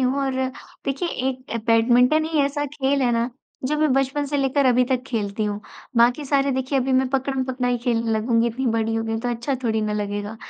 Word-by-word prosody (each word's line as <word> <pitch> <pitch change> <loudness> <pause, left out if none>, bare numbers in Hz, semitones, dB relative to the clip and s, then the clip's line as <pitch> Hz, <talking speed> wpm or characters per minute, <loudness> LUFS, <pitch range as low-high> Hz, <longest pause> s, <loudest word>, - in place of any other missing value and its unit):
हूँ 260 +2 +1
और 270 - -1 0.5
देखिए 275 +6 -1 0.2
एक 255 -2 -5
बैडमिंटन 245 +6 +4
ही 320 -1 -1
ऐसा 285 +1 0
खेल 275 -1 0
है 245 - +3
ना, 235 +1 0 0.3
जो 300 +3 0
मैं 305 -3 +3
बचपन 270 +2 +1
से 290 - -1
लेकर 275 0 +2
अभी 250 0 +4
तक 255 -1 +1
खेलती 215 -2 -2
हूँ। 205 0 -2 0.4
बाकी 245 +5 +4
सारे 275 0 +2
देखिए 265 +1 0
अभी 265 +1 0
मैं 260 0 +3
पकड़म-पकड़ाई 260 -2 -1
खेलने 230 -2 +1
लगूँगी 230 +1 +2
इतनी 250 +3 -2
बड़ी 225 -1 0
हो 225 - 0
गई 225 - -3
हूँ 225 - -2
तो 245 - -2
अच्छा 240 +3 -2
थोड़ी 220 -1 +1
ना 215 0 -1
लगेगा। 205 +1 -3
255 Hz, 210 wpm, -23 LUFS, 230-270 Hz, 0.5 s, बैडमिंटन